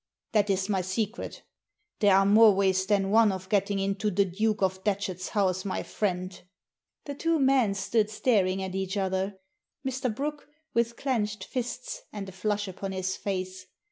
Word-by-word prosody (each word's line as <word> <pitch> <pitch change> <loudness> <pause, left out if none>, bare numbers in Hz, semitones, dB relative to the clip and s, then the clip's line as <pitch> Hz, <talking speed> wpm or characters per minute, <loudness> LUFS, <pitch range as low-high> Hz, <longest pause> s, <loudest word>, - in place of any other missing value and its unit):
"That 210 -2 +2
is 190 -1 +1
my 195 -3 +1
secret 205 +5 -3 0.6
There 205 -3 +5
are 195 0 +5
more 210 +1 +7
ways 190 -1 +2
than 195 -2 +2
one 220 -1 +5
of 185 0 -6
getting 200 0 +1
into 195 +2 0
the 200 0 +2
Duke 210 +3 0
of 190 0 0
Datchet's 195 -3 -2
house, 190 -3 +1
my 195 - -2
friend." 185 -2 -3 0.6
The 285 - -4
two 330 +3 +1
men 265 -7 +3
stood 210 +2 +1
staring 195 -4 +1
at 190 -1 -4
each 190 +1 -2
other. 190 0 -1 0.5
Mr. 260 -1 -1
Brooke 290 +6 -4 0.3
with 235 0 +1
clenched 220 -6 -1
fists - - -4
and 200 -2 -6
a - - -8
flush 205 +2 -1
upon 190 +1 -5
his 185 0 -2
face. 185 -1 -4
200 Hz, 170 wpm, -28 LUFS, 190-220 Hz, 0.6 s, more